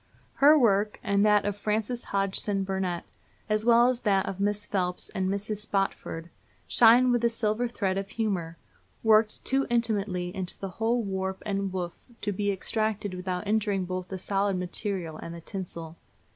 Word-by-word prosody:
Her 295 +3 +8
work, 210 -5 +2
and 200 0 +2
that 210 -1 +4
of 205 -1 -1
Frances 215 +3 -2
Hodgson 195 0 0
Burnett, 190 -2 -2 0.4
as 215 0 +1
well 235 0 +6
as 250 -1 +1
that 200 -5 +2
of 195 - -5
Miss 205 +1 0
Phelps 180 -2 -1
and 190 -2 -1
Mrs. 205 +2 -2
Spofford, 195 -5 -3 0.4
shine 245 +2 +6
with 240 -1 +1
a 235 - +4
silver 225 +1 0
thread 195 -5 -1
of 195 0 -6
humor, 185 -8 -2 0.5
worked 220 -1 +3
too 270 +1 +1
intimately 205 -6 0
into 185 -2 -4
the 195 - -5
whole 225 +5 0
warp 190 -1 -3
and 195 -2 -1
woof 180 -2 -3 0.3
to 205 - -1
be 205 +1 0
extracted 210 0 -1
without 180 +1 -3
injuring 205 -3 +1
both 185 0 -4
the 190 - -5
solid 195 +1 0
material 180 -2 -3
and 170 - -7
the 170 - -9
tinsel. 170 -3 -6
200 Hz, 170 wpm, -28 LUFS, 185-215 Hz, 0.5 s, Her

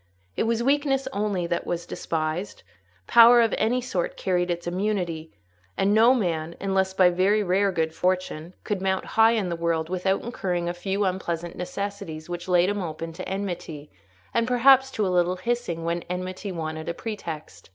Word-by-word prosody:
It - - 0
was 230 0 0
weakness 275 0 +1
only 200 -3 -1
that 170 0 -2
was 175 0 -2
despised; 160 +4 -3 0.4
power 235 - +8
of 230 -2 +3
any 240 +4 +1
sort 185 -8 -3
carried 180 -1 0
its 175 0 -2
immunity; 175 -3 -2 0.5
and 200 +1 +2
no 230 +4 +6
man, 170 -7 -2
unless 190 -1 0
by 185 -2 +5
very 195 +4 +2
rare 195 +2 +2
good 160 -3 -1
fortune, 180 -2 -2
could 205 -3 -2
mount 190 0 0
high 225 +1 +4
in 210 -6 0
the 170 - -2
world 165 -1 -1
without 185 +1 0
incurring 180 -7 -2
a 175 - -1
few 195 +3 -1
unpleasant 175 -2 -3
necessities 180 -3 -5
which 175 0 -5
laid 180 0 +3
him 205 0 -1
open 165 -1 -5
to 185 +2 -7
enmity, 175 -6 -5 0.4
and 230 0 +1
perhaps 265 +2 +5
to 215 -6 -1
a 185 -1 0
little 175 +1 +2
hissing, 185 -7 -2
when 170 +1 -1
enmity 185 +2 -4
wanted 160 -2 -4
a 170 - -3
pretext. 170 - -7
185 Hz, 175 wpm, -25 LUFS, 170-210 Hz, 0.5 s, power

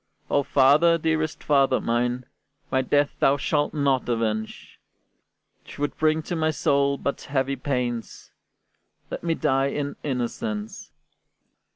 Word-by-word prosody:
"O 145 - +3
father, 145 +5 +4
dearest 160 -1 -1
father 135 -3 +3
mine! 120 +2 -1 0.5
My 130 - +2
death 145 +2 +2
thou 140 +1 +4
shalt 145 +1 0
not 140 -4 0
avenge: 110 -2 -3 0.9
'Twould 145 0 -4
bring 155 0 +2
to 175 - -4
my 160 -1 +1
soul 140 -2 +1
but 140 - -3
heavy 140 -1 -1
pains; 125 -3 -3 0.8
Let - - -5
me 165 -1 0
die 135 -1 +1
in 145 0 -3
innocence. 115 -5 -4
140 Hz, 120 wpm, -24 LUFS, 125-150 Hz, 0.9 s, father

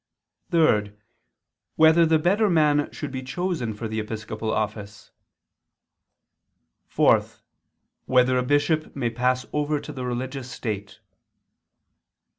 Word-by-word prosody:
(3) 105 - +2 0.8
Whether 160 +1 +5
the 160 0 +4
better 200 +7 +2
man 150 -4 +2
should 150 - -6
be 130 -1 -4
chosen 145 -2 -3
for 110 +2 -5
the 110 0 -3
episcopal 110 0 -4
office? 105 -1 -4 1.8
(4) - - +3 0.8
Whether 125 0 +3
a 125 - +2
bishop 145 +4 0
may 120 -4 -1
pass 125 +2 0
over 150 0 0
to 150 - -9
the 130 -2 -6
religious 125 +1 -4
state? 105 -5 -6
130 Hz, 110 wpm, -24 LUFS, 110-155 Hz, 1.8 s, Whether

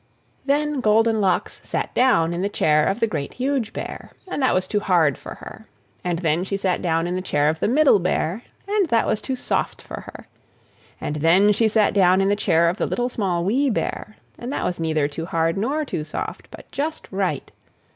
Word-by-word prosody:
Then 295 0 +1
Goldenlocks 215 -3 +2
sat - - -3
down 170 -10 +3
in 170 - -3
the 200 - 0
chair 155 -5 +2
of 195 - 0
the 230 - +3
Great, 155 -10 -4
Huge 260 -3 -1
Bear, - - -7 0.2
and 325 - -3
that 260 - +3
was 185 0 0
too 210 - 0
hard 170 -8 +2
for - - -9
her. - - -12 0.4
And 175 -1 -1
then 165 0 0
she 195 +1 -2
sat 190 -2 -1
down 165 -1 0
in 175 - -2
the 185 - -2
chair 145 -5 +1
of 160 +1 -2
the - - +1
Middle 270 -2 +5
Bear, 180 +2 -1 0.3
and 405 -2 +1
that 230 -3 +3
was 215 - 0
too 265 - -3
soft - - -2
for - - -8
her. - - -11 0.7
And 150 - -3
then 175 +7 +4
she 220 +2 +3
sat 215 -1 +2
down 185 -2 +4
in 195 0 +2
the 205 - +3
chair 170 -5 +2
of 175 +3 0
the - - -1
Little, 245 +1 -1
Small, 180 -7 -1
Wee 265 +8 +2
Bear, 215 -1 -3 0.2
and 245 +2 -5
that - - -2
was 180 - -2
neither 155 -3 +1
too 165 +3 -6
hard 165 -1 0
nor 275 +10 -1
too 155 - -3
soft, 155 - -6
but - - -13
just 310 +3 -3
right. 190 -7 -2
195 Hz, 215 wpm, -22 LUFS, 165-235 Hz, 0.7 s, Middle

